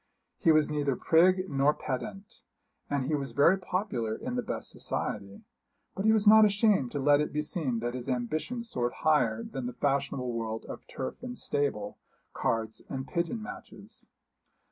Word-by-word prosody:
He 165 - +4
was 155 -1 +3
neither 145 -3 0
prig 185 +6 +4
nor 140 -1 +2
pedant, 195 +9 -6 0.5
and 140 -2 0
he 155 - -1
was 140 -2 -2
very 170 +7 +5
popular 180 - -2
in 250 +1 -5
the 250 - 0
best - - -4
society; 100 -1 -4 0.5
but 195 - -3
he 220 - +6
was 215 -1 +3
not 220 +1 +9
ashamed 205 - +3
to 145 - -1
let 145 +1 +4
it 150 - -2
be 150 0 -1
seen 140 -7 -2
that 120 +1 -2
his 125 +1 -5
ambition 155 - -2
soared 120 - -2
higher 115 -8 +3
than 130 -3 -5
the 125 - -5
fashionable 135 -2 -1
world 115 -1 -4
of - - -9
turf 130 - -6
and 250 0 -6
stable, 140 -8 -2 0.3
cards 110 -1 -1
and 135 0 -4
pigeon 175 +6 -2
matches. - - -10
145 Hz, 170 wpm, -29 LUFS, 125-185 Hz, 0.5 s, not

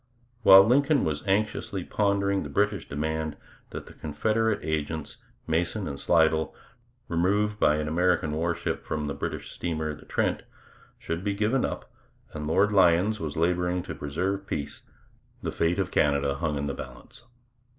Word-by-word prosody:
While 95 -3 +9
Lincoln 140 +5 +3
was 75 -2 -2
anxiously 100 -1 0
pondering 100 -1 +1
the - - -6
British 105 0 0
demand 80 +1 -2 0.3
that - - -7
the - - -13
Confederate 110 +8 0
agents, 80 -1 -3 0.3
Mason 85 +5 -1
and 70 -1 -5
Slidell, 80 -2 +2 0.5
removed 105 +5 +1
by 75 - +4
an 75 0 -2
American 85 -1 +1
warship 85 +2 -2
from 75 -1 -3
the 70 - -2
British 70 - -5
steamer 80 -3 -3
the - - -13
Trent, - - 0 0.6
should 85 +2 -4
be 100 -1 -1
given 110 +6 +1
up, - - -3 0.5
and 75 -1 -5
Lord 100 +6 +3
Lyons 95 +2 +4
was 80 -2 -4
labouring 90 +1 +1
to - - -6
preserve 95 +7 -3
peace, 70 -1 -5 0.6
the - - -2
fate 85 +1 0
of 95 -2 -1
Canada 70 -1 +2
hung 75 +2 -2
in 70 - -2
the 70 - -2
balance. 65 -2 -11
85 Hz, 155 wpm, -27 LUFS, 75-100 Hz, 0.6 s, While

